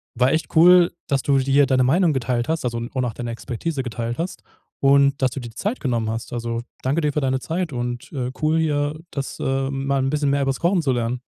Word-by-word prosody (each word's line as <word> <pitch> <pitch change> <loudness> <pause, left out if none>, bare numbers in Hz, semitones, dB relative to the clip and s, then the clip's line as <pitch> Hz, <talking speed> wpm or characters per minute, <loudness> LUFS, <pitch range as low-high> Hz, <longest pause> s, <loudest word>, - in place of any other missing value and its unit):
war 125 +2 +3
echt 155 +2 -1
cool, 175 +1 +7 0.2
dass 140 -1 +1
du 140 -1 +2
dir 135 +2 +4
deine 130 -1 +2
Meinung 165 +6 +3
geteilt 125 +1 -1
hast, 160 -4 -1
also 120 -1 -1
und 125 +2 -3
auch 120 - -3
deine 120 +1 -5
Expertise 135 +5 -4
geteilt 120 -1 -4
hast 170 +3 -4 0.4
und, 140 0 +4
dass 130 -1 +2
du 130 - -5
dir 120 -2 -7
die 115 - -18
Zeit 215 +6 -2
genommen 120 -4 -1
hast. 115 +2 -5
Also, 115 -1 -3 0.2
danke 140 +5 0
dir 150 -2 0
für 150 - 0
deine 130 -1 0
Zeit 165 +4 -3
und, 120 -1 -4
äh, 125 -4 -3
cool, 155 +1 +2
hier 150 -1 0
das 140 -1 -5
äh, 135 0 -1
mal 135 0 -1
'n 135 - 0
bisschen 145 0 0
mehr 140 0 +1
über's 135 -1 0
Kochen 175 +1 +2
zu 140 -4 +1
lernen. 120 0 -1
135 Hz, 240 wpm, -22 LUFS, 120-150 Hz, 0.4 s, cool